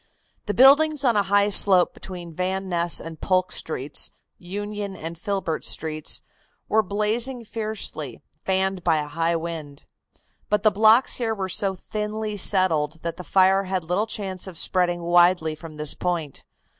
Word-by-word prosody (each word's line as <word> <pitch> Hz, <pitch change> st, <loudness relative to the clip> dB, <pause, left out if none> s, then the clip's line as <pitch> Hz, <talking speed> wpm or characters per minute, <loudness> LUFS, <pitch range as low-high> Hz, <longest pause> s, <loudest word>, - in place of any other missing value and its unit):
The 205 Hz, -, -2 dB
buildings 285 Hz, +3 st, +5 dB
on 240 Hz, -3 st, +3 dB
a 205 Hz, -, +4 dB
high 200 Hz, +1 st, +2 dB
slope 190 Hz, -3 st, +5 dB
between 175 Hz, -3 st, -9 dB
Van 190 Hz, +3 st, -3 dB
Ness 170 Hz, -1 st, +1 dB
and 160 Hz, -1 st, -9 dB
Polk 185 Hz, -1 st, +1 dB
Streets, 145 Hz, -2 st, -3 dB, 0.3 s
Union 205 Hz, +2 st, -5 dB
and 165 Hz, 0 st, -7 dB
Filbert 175 Hz, -2 st, -3 dB
Streets, 155 Hz, -1 st, -1 dB, 0.5 s
were 220 Hz, -, +3 dB
blazing 225 Hz, +5 st, 0 dB
fiercely, 215 Hz, -, -4 dB, 0.2 s
fanned 190 Hz, -1 st, -1 dB
by 165 Hz, -2 st, +2 dB
a 150 Hz, -, -2 dB
high 165 Hz, +3 st, -1 dB
wind, 160 Hz, -4 st, -6 dB, 0.6 s
but 210 Hz, 0 st, +1 dB
the 215 Hz, -, +5 dB
blocks 220 Hz, +5 st, +4 dB
here 225 Hz, -3 st, -1 dB
were 195 Hz, -2 st, -3 dB
so 195 Hz, 0 st, 0 dB
thinly 210 Hz, +2 st, -4 dB
settled 165 Hz, -6 st, +2 dB
that 170 Hz, 0 st, -4 dB
the 180 Hz, -, -7 dB
fire 190 Hz, +1 st, +3 dB
had 185 Hz, -1 st, -2 dB
little 180 Hz, +7 st, -1 dB
chance 195 Hz, -4 st, -4 dB
of 180 Hz, -3 st, -6 dB
spreading 175 Hz, -1 st, +1 dB
widely 175 Hz, -1 st, +3 dB
from 155 Hz, 0 st, -11 dB
this 150 Hz, -1 st, +1 dB
point. 170 Hz, -6 st, -4 dB
185 Hz, 155 wpm, -23 LUFS, 165-210 Hz, 0.6 s, buildings